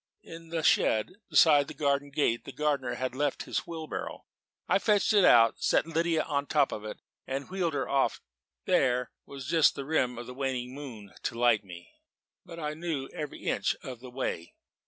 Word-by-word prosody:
In 165 Hz, 0 st, -11 dB
the 165 Hz, -1 st, -2 dB
shed 110 Hz, -, +2 dB
beside 145 Hz, -3 st, +6 dB
the 155 Hz, -, -9 dB
garden 140 Hz, 0 st, 0 dB
gate 135 Hz, -5 st, 0 dB
the -, -, -8 dB
gardener 145 Hz, -2 st, -1 dB
had 130 Hz, -1 st, -3 dB
left 145 Hz, +3 st, -1 dB
his -, -, -3 dB
wheelbarrow. 160 Hz, -2 st, -6 dB, 0.4 s
I -, -, +3 dB
fetched 210 Hz, 0 st, +2 dB
it 205 Hz, -2 st, +5 dB
out, 115 Hz, -7 st, +6 dB
set -, -, +3 dB
Lydia 165 Hz, 0 st, +1 dB
on 140 Hz, -1 st, -1 dB
the -, -, -7 dB
top 145 Hz, -3 st, +3 dB
of 105 Hz, -, -5 dB
it, 110 Hz, -, -6 dB, 0.3 s
and 135 Hz, +5 st, -4 dB
wheeled 175 Hz, -5 st, -1 dB
her 135 Hz, -, -1 dB
off 135 Hz, -1 st, +2 dB
towards -, -, -15 dB, 0.4 s
Woeful -, -, -1 dB
Ness. -, -, +6 dB
There 125 Hz, -1 st, 0 dB, 0.2 s
was 135 Hz, -2 st, -8 dB
just 160 Hz, +2 st, +4 dB
the 140 Hz, -, -5 dB
rim 125 Hz, -5 st, 0 dB
of 120 Hz, -, -7 dB
a 125 Hz, -, -7 dB
waning 130 Hz, -2 st, -3 dB
moon 120 Hz, -8 st, -9 dB
to 115 Hz, -, -3 dB
light 120 Hz, -3 st, +3 dB
me, 85 Hz, -2 st, -12 dB, 0.5 s
but 170 Hz, -2 st, -11 dB
I 150 Hz, -1 st, -3 dB
knew 155 Hz, -4 st, -4 dB
every 150 Hz, -2 st, -7 dB
inch -, -, 0 dB
of 125 Hz, -3 st, -7 dB
the 125 Hz, +1 st, -10 dB
way. 125 Hz, -9 st, -4 dB
140 Hz, 205 wpm, -29 LUFS, 125-160 Hz, 0.5 s, beside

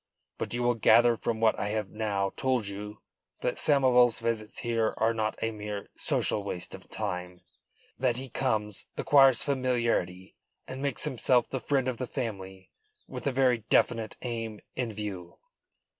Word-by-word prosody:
But -, -, -2 dB
you 120 Hz, -, -1 dB
will 120 Hz, 0 st, +3 dB
gather 115 Hz, +1 st, +5 dB
from 115 Hz, 0 st, -2 dB
what 110 Hz, -1 st, +3 dB
I -, -, -1 dB
have 105 Hz, -1 st, -2 dB
now 100 Hz, -3 st, -1 dB
told 130 Hz, -4 st, 0 dB
you 105 Hz, +1 st, -7 dB, 0.4 s
that -, -, -1 dB
Samoval's 125 Hz, -5 st, +4 dB
visits 115 Hz, -2 st, -3 dB
here 115 Hz, -2 st, 0 dB
are 115 Hz, +1 st, +2 dB
not 110 Hz, -1 st, -2 dB
a 115 Hz, -, 0 dB
mere 105 Hz, -1 st, -6 dB
social 105 Hz, -, 0 dB
waste 90 Hz, -3 st, -5 dB
of -, -, -11 dB
time. 90 Hz, 0 st, -4 dB, 0.6 s
That 125 Hz, -2 st, +1 dB
he 135 Hz, +1 st, -5 dB
comes, 110 Hz, -5 st, -1 dB
acquires 135 Hz, -4 st, +5 dB
familiarity 120 Hz, -9 st, -1 dB, 0.3 s
and 130 Hz, +1 st, -6 dB
makes 140 Hz, -3 st, -1 dB
himself 125 Hz, -3 st, +2 dB
the 130 Hz, -, -2 dB
friend 135 Hz, +1 st, 0 dB
of 130 Hz, -2 st, -2 dB
the 125 Hz, -, -4 dB
family 95 Hz, -6 st, -6 dB, 0.4 s
with -, -, -6 dB
a -, -, +2 dB
very 130 Hz, -2 st, +3 dB
definite 115 Hz, -2 st, +2 dB
aim 115 Hz, -3 st, -4 dB, 0.2 s
in 125 Hz, -3 st, -2 dB
view." 100 Hz, -5 st, -6 dB
115 Hz, 160 wpm, -29 LUFS, 105-125 Hz, 0.6 s, gather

